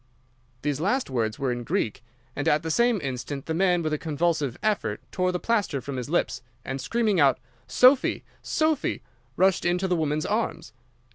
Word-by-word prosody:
"These 145 -1 -1
last 205 - 0
words 115 -3 -1
were 135 -3 -1
in 120 0 -3
Greek, 115 +1 -2 0.3
and 145 - -2
at 150 +1 +3
the 160 - -2
same 235 +4 +3
instant 135 +1 -4
the 160 - -2
man 180 0 +2
with 155 -1 -1
a 150 - -1
convulsive 155 -4 -1
effort 205 - 0
tore 185 -1 +1
the 180 - -1
plaster 205 -11 0
from 130 +1 -6
his 125 +2 -4
lips, 165 -6 0 0.2
and 135 0 -4
screaming 215 - +1
out 140 -3 +5 0.3
'Sophy! 250 - +4 0.2
Sophy!' 315 -2 0 0.3
rushed 190 0 +3
into 180 +2 +1
the 180 - +1
woman's 155 -2 0
arms. 215 +3 -2
160 Hz, 180 wpm, -26 LUFS, 135-195 Hz, 0.3 s, out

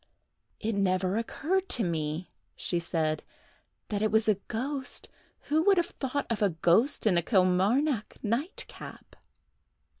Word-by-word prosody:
"It 225 +1 -1
never 185 -1 +1
occurred 350 - -1
to 235 - +1
me," 160 0 -2 0.3
she 175 - -1
said, 160 -2 -1 0.7
"that 205 -1 -1
it 215 - +2
was 220 0 +3
a 210 -3 +3
ghost. 265 +4 -3 0.3
Who 310 +2 +1
could 395 +1 +5
have 345 - 0
thought 275 +1 -1
of 225 - -1
a 205 - +4
ghost 175 - +2
in 185 -5 +4
a - - 0
Kilmarnock 200 - +2
nightcap!" 245 - -4
215 Hz, 140 wpm, -29 LUFS, 180-270 Hz, 0.7 s, could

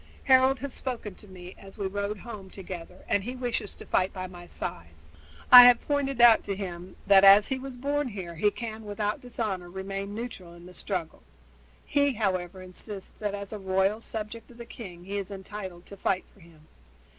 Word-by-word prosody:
Harold 265 0 +5
has 270 +1 -6
spoken 235 -6 -5
to 210 - -14
me 180 -1 -11
as 195 -1 -13
we 200 - -3
rode 200 +2 -2
home 205 -3 -9
together, 180 -2 -9
and 200 - +1
he 250 +4 -5
wishes 245 -5 -3
to - - -12
fight 185 +1 +1
by 185 -1 -5
my 175 -1 -11
side. 85 - -6 0.6
I 245 -1 +13
have 245 -1 +7
pointed 275 -3 0
out 235 -2 +7
to 200 - -2
him 185 -2 -7
that 195 -1 +7
as 200 +1 +8
he 265 -1 -1
was 260 -1 -8
born 285 +2 -1
here 190 -7 -6
he 190 +6 +2
can 220 0 -7
without 210 0 -3
dishonor 215 -7 -4
remain 195 +2 -5
neutral 210 -7 -7
in 170 0 -14
the 180 - -12
struggle. 180 -3 -4 0.6
He, 285 -1 +2
however, 185 -4 -2
insists 190 +2 -8
that 205 -1 -2
as 200 +1 -7
a 210 - -5
royal 190 +3 +1
subject 220 0 -6
of 240 - -15
the 235 - -8
king 180 -8 -10
he 200 +1 -3
is 195 - -6
entitled 190 -2 -8
to 200 - -11
fight 185 0 0
for - - -22
him. 165 -3 -19
200 Hz, 200 wpm, -28 LUFS, 185-235 Hz, 0.6 s, I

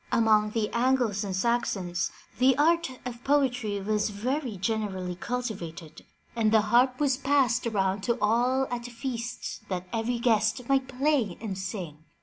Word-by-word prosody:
Among 215 -2 +4
the 215 0 -1
Angles 240 -4 +1
and 195 -2 -3
Saxons 195 -5 0 0.3
the 260 0 +5
art 335 +1 +3 0.2
of 240 -1 -6
poetry 250 -7 +1
was 210 +2 0
very 245 +2 -2
generally 195 -3 -2
cultivated, 175 -7 -5 0.3
and 220 -2 +2
the 220 -1 +5
harp 245 +4 +3
was 275 -3 +2
passed 265 -4 +2
around 195 -3 0
to 235 0 +1
all 245 +5 +2
at 240 -1 -3
feasts 240 -1 -5
that 185 -1 -3
every 235 +2 0
guest 230 +1 +1
might 270 -1 +2
play 260 - 0
and 210 -4 -4
sing. 180 -5 -6
230 Hz, 145 wpm, -27 LUFS, 205-255 Hz, 0.3 s, the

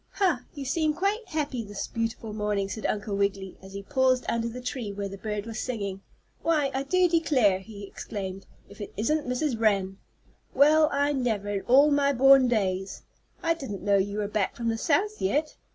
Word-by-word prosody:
"Ha! 340 -11 +1
you 280 -2 -6
seem 305 +2 0
quite 400 +6 -1
happy 295 -8 -2
this 205 -1 -5
beautiful 225 -1 -4
morning," 210 -2 -1
said 220 - -3
Uncle 205 -1 -2
Wiggily, 200 -1 -2
as 190 0 -12
he 200 0 -6
paused 255 +3 +2
under 230 0 -1
the 245 +2 -7
tree 245 -4 -4
where 200 0 -4
the 195 - -7
bird 210 0 -4
was 225 -1 -6
singing. 200 -6 -4 0.4
"Why, 300 -4 +1
I 265 - -1
do 365 +6 +3
declare," 275 - +3
he 200 +1 -11
exclaimed. 195 -1 -7 0.2
"If 205 - -13
it 205 - -7
isn't 295 +8 0
Mrs. 250 -1 -1
Wren! 195 -3 +1 0.6
Well, 305 +3 +5
I 285 +1 +1
never 225 -7 -1
in 200 -1 -1
all 280 +4 +6
my 280 0 +3
born 270 0 +6
days! 195 -5 -1 0.4
I 330 -1 +3
didn't 270 - -7
know 200 -1 +3
you 200 +1 -1
were 210 -1 -1
back 210 -2 -1
from 230 -1 -2
the 225 - -1
South 405 - +1
yet." 295 +11 0
230 Hz, 195 wpm, -27 LUFS, 200-285 Hz, 0.6 s, all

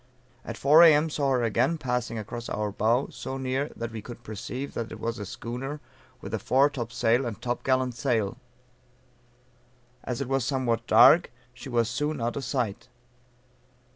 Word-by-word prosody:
At - - -7
4 150 +4 +6
A.M. 160 -1 +6
saw 140 -2 0
her 125 -2 +1
again 120 +8 +1
passing 125 -4 -2
across 115 +3 -6
our 105 -1 -2
bow, 115 +6 +1
so 135 - -6
near 130 +2 -2
that 115 0 -5
we 110 -1 -6
could 120 +2 -10
perceive 120 +5 -6
that 115 -1 -4
it - - -8
was 115 0 -3
a 105 - -5
schooner 130 +8 -5 0.4
with - - -8
a - - 0
fore 135 +3 +3
top 120 -4 -5
sail 120 +1 +2
and 115 -4 -5
top 120 +1 -3
gallant 130 -1 +1
sail. 115 -3 -1 1.7
As 125 0 -4
it 140 - -3
was 135 -1 0
somewhat 120 -3 -1
dark 125 +10 +7 0.2
she 125 +2 -10
was 120 -2 +1
soon 150 +4 -2
out 120 +1 -2
of 140 - -4
sight. 120 -8 -2
125 Hz, 175 wpm, -27 LUFS, 115-135 Hz, 1.7 s, dark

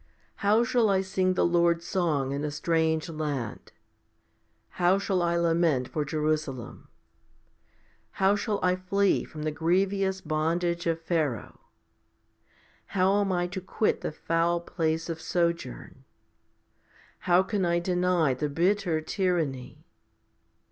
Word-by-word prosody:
How 215 +3 +3
shall 240 -3 +2
I 190 -1 +3
sing 190 -1 0
the - - +2
Lord's 170 0 +2
song 155 -9 0
in 140 +1 -3
a 150 - -1
strange 160 +2 0
land? 150 -8 -4
10 - - -31 1.0
How 180 +2 +2
shall 195 -2 0
I 170 0 +1
lament 165 -6 +1
for 150 - -2
Jerusalem? 150 -4 -3 1.3
How 195 +1 +3
shall 205 -1 -2
I 180 0 +3
flee 195 +2 +1
from 155 -2 -8
the 155 - -1
grievous 190 +4 0
bondage 170 +2 -1
of 165 0 0
Pharaoh? 160 - -2 1.4
How 195 +2 +3
am 195 -1 0
I 175 -1 +1
to 185 +1 -5
quit 210 +3 0
the - - -3
foul 165 +2 0
place 165 -2 -2
of 165 -1 -5
sojourn? 170 - -2 1.3
How 175 +2 +6
can 195 0 -2
I 170 -1 +2
deny 175 -4 +1
the 145 +4 -2
bitter 175 +1 +1
tyranny? 155 -6 -2
170 Hz, 130 wpm, -27 LUFS, 155-185 Hz, 1.4 s, How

